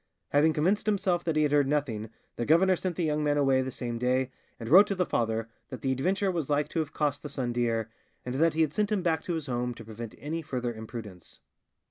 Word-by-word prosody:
Having 155 Hz, +2 st, +4 dB
convinced 190 Hz, +8 st, +1 dB
himself 185 Hz, -4 st, +1 dB
that 165 Hz, -2 st, 0 dB
he 155 Hz, -, +3 dB
had 150 Hz, -, +1 dB
heard 145 Hz, -2 st, +4 dB
nothing, 130 Hz, -7 st, -1 dB, 0.3 s
the -, -, -2 dB
governor 175 Hz, +8 st, +4 dB
sent 180 Hz, 0 st, -3 dB
the 175 Hz, -, -1 dB
young 150 Hz, -1 st, 0 dB
man 145 Hz, 0 st, +2 dB
away 135 Hz, -2 st, +3 dB
the 130 Hz, -, -3 dB
same 120 Hz, -2 st, -4 dB
day, 130 Hz, +1 st, +1 dB, 0.3 s
and 115 Hz, -, -6 dB
wrote 190 Hz, -, +8 dB
to 200 Hz, -, -1 dB
the 180 Hz, -1 st, +1 dB
father 115 Hz, -4 st, -1 dB, 0.2 s
that 130 Hz, -4 st, -7 dB
the 135 Hz, -, +1 dB
adventure 190 Hz, +9 st, +1 dB
was 165 Hz, -6 st, -3 dB
like 145 Hz, 0 st, +1 dB
to 165 Hz, -, -2 dB
have 155 Hz, -2 st, -2 dB
cost 145 Hz, -2 st, -1 dB
the 150 Hz, -, -7 dB
son 130 Hz, -4 st, -2 dB
dear, 115 Hz, -2 st, 0 dB, 0.4 s
and 125 Hz, -, -3 dB
that 160 Hz, +4 st, +2 dB
he 160 Hz, -, +2 dB
had 155 Hz, -2 st, +1 dB
sent 210 Hz, 0 st, 0 dB
him 200 Hz, -4 st, +1 dB
back 160 Hz, -3 st, +1 dB
to 175 Hz, -, -3 dB
his 160 Hz, -3 st, -3 dB
home 125 Hz, -2 st, -2 dB
to 115 Hz, -, -11 dB
prevent 110 Hz, 0 st, -8 dB
any 160 Hz, +3 st, -4 dB
further 125 Hz, -6 st, -3 dB
imprudence. 110 Hz, -5 st, -9 dB
145 Hz, 245 wpm, -28 LUFS, 120-165 Hz, 0.4 s, wrote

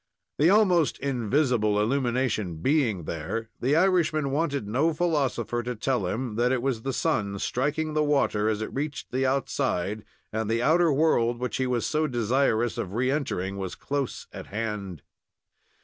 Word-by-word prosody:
The 155 Hz, +4 st, +5 dB
almost 185 Hz, -6 st, +4 dB
invisible 125 Hz, -4 st, +1 dB
illumination 120 Hz, -5 st, 0 dB
being 115 Hz, -, +1 dB
there, 85 Hz, +9 st, -4 dB
the 135 Hz, +5 st, +2 dB
Irishman 165 Hz, -5 st, +2 dB
wanted 140 Hz, -6 st, -1 dB
no 145 Hz, +9 st, +1 dB
philosopher 140 Hz, -8 st, 0 dB
to 125 Hz, +1 st, -4 dB
tell 110 Hz, -2 st, 0 dB
him 115 Hz, +2 st, -3 dB
that 120 Hz, +1 st, +2 dB
it 125 Hz, -2 st, 0 dB
was 130 Hz, -5 st, -1 dB
the 135 Hz, -, -2 dB
sun 105 Hz, -9 st, 0 dB
striking 150 Hz, +8 st, -1 dB
the 155 Hz, 0 st, +2 dB
water 135 Hz, -8 st, +2 dB
as 110 Hz, 0 st, -1 dB
it -, -, -6 dB
reached 145 Hz, +1 st, -4 dB
the 130 Hz, +1 st, +1 dB
outside, 110 Hz, -7 st, -1 dB, 0.3 s
and 110 Hz, -1 st, -1 dB
the 115 Hz, +1 st, +1 dB
outer 165 Hz, +3 st, +4 dB
world, 130 Hz, -5 st, +2 dB
which 125 Hz, -2 st, -3 dB
he 130 Hz, 0 st, 0 dB
was 125 Hz, -2 st, 0 dB
so 155 Hz, 0 st, +1 dB
desirous 120 Hz, -1 st, +1 dB
of 95 Hz, -, -4 dB
re 130 Hz, +3 st, +1 dB
entering, 100 Hz, -10 st, -2 dB
was 95 Hz, -2 st, -4 dB
close 140 Hz, -2 st, -3 dB
at -, -, -8 dB
hand. 105 Hz, -5 st, -4 dB
125 Hz, 165 wpm, -26 LUFS, 110-145 Hz, 0.3 s, The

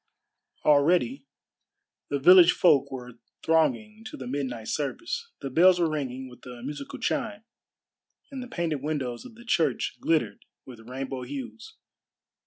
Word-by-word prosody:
Already 175 Hz, -, +3 dB, 0.8 s
the 140 Hz, -, 0 dB
village 175 Hz, +4 st, +8 dB
folk 140 Hz, -6 st, +4 dB
were 125 Hz, -2 st, -8 dB, 0.2 s
thronging 215 Hz, +7 st, +1 dB
to -, -, -8 dB
the 130 Hz, -, -7 dB
midnight 125 Hz, -4 st, -4 dB
service. 345 Hz, -, -3 dB
The 135 Hz, -, -5 dB
bells 180 Hz, +5 st, +5 dB
were 165 Hz, -2 st, +2 dB
ringing 130 Hz, -3 st, -4 dB
with 125 Hz, -1 st, -15 dB
a 120 Hz, -1 st, -9 dB
musical 140 Hz, +1 st, -6 dB
chime, 210 Hz, -1 st, -2 dB, 0.9 s
and 270 Hz, -2 st, -6 dB
the 250 Hz, -, -7 dB
painted 165 Hz, -, -2 dB
windows 135 Hz, -5 st, -3 dB
of 255 Hz, -, -12 dB
the 235 Hz, +1 st, -15 dB
church 155 Hz, -, 0 dB
glittered 150 Hz, -11 st, 0 dB, 0.2 s
with 120 Hz, -2 st, -12 dB
rainbow 130 Hz, 0 st, -5 dB
hues. 285 Hz, -, -8 dB
150 Hz, 140 wpm, -27 LUFS, 130-185 Hz, 0.9 s, village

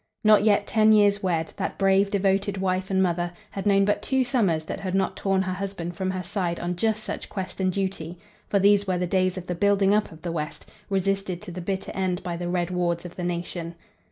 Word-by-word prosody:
Not 215 Hz, -1 st, +6 dB
yet 205 Hz, -1 st, +3 dB
ten 220 Hz, 0 st, +4 dB
years 205 Hz, -1 st, +4 dB
wed, 165 Hz, -4 st, -1 dB
that -, -, -3 dB
brave, 195 Hz, 0 st, +3 dB
devoted 195 Hz, 0 st, +1 dB
wife 185 Hz, 0 st, -1 dB
and 190 Hz, -1 st, +3 dB
mother 175 Hz, -1 st, 0 dB, 0.2 s
had 195 Hz, +1 st, -4 dB
known 195 Hz, -1 st, +4 dB
but 205 Hz, -, +1 dB
two 265 Hz, -1 st, +1 dB
summers 200 Hz, -, +1 dB
that -, -, -5 dB
had 185 Hz, -1 st, -3 dB
not 195 Hz, 0 st, +1 dB
torn 195 Hz, -1 st, +1 dB
her 185 Hz, -1 st, -2 dB
husband 180 Hz, -3 st, -5 dB
from 190 Hz, +1 st, -2 dB
her 185 Hz, -1 st, -3 dB
side 180 Hz, -2 st, -2 dB
on 175 Hz, +1 st, -2 dB
just 215 Hz, +3 st, 0 dB
such -, -, -5 dB
quest 190 Hz, -1 st, -5 dB
and 185 Hz, 0 st, +2 dB
duty, 185 Hz, -3 st, -3 dB, 0.3 s
for 200 Hz, -, +2 dB
these 200 Hz, +1 st, +4 dB
were 185 Hz, -1 st, +1 dB
the 180 Hz, -, 0 dB
days 185 Hz, +1 st, +1 dB
of 180 Hz, -, -6 dB
the 180 Hz, -, -2 dB
building 200 Hz, +2 st, +3 dB
up 210 Hz, 0 st, +1 dB
of 160 Hz, -1 st, -14 dB
the 175 Hz, -, -2 dB
West, 150 Hz, -2 st, -5 dB, 0.2 s
resisted 195 Hz, -1 st, 0 dB
to -, -, -7 dB
the 180 Hz, +1 st, -6 dB
bitter 190 Hz, +2 st, -3 dB
end 185 Hz, -2 st, -1 dB
by 175 Hz, -1 st, -3 dB
the 175 Hz, 0 st, -4 dB
red 175 Hz, 0 st, -1 dB
wards 175 Hz, -1 st, -1 dB
of 175 Hz, -, -8 dB
the 180 Hz, -, -5 dB
nation. 175 Hz, -1 st, -4 dB
190 Hz, 235 wpm, -25 LUFS, 175-200 Hz, 0.3 s, Not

